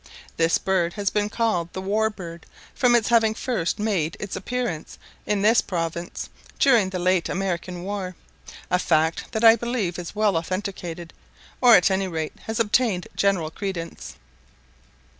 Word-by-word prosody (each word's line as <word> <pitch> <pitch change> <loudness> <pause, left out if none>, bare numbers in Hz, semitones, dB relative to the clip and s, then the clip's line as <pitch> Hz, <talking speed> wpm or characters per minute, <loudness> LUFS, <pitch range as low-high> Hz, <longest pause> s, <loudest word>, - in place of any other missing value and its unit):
This 165 0 +3
bird 185 -3 0
has 200 -1 -1
been 210 0 0
called 210 -7 0
the - - -4
"war 215 +3 +1
bird," 170 -5 -9 0.3
from 245 -1 +3
its 230 -2 +2
having 225 -2 +4
first 230 -9 -1
made 200 -5 -1
its 205 - -5
appearance 240 -7 -4 0.3
in 205 -1 0
this 220 +2 +5
province 170 -1 -4 0.3
during 235 -8 +4
the 190 - -4
late 180 -1 +1
American 180 -1 -3
war; 190 -2 -4 0.6
a 180 - +3
fact 160 -2 +1
that 220 -2 -2
I 225 0 +9
believe 230 -7 -2
is 175 +3 -7
well 210 -4 +2
authenticated, 175 -1 -4 0.5
or 245 -2 +8
at 180 +2 +4
any 190 0 0
rate 160 -3 -3
has 220 0 -2
obtained 215 -4 +1
general 185 -6 +1
credence. 170 - -6
190 Hz, 155 wpm, -24 LUFS, 170-220 Hz, 0.6 s, I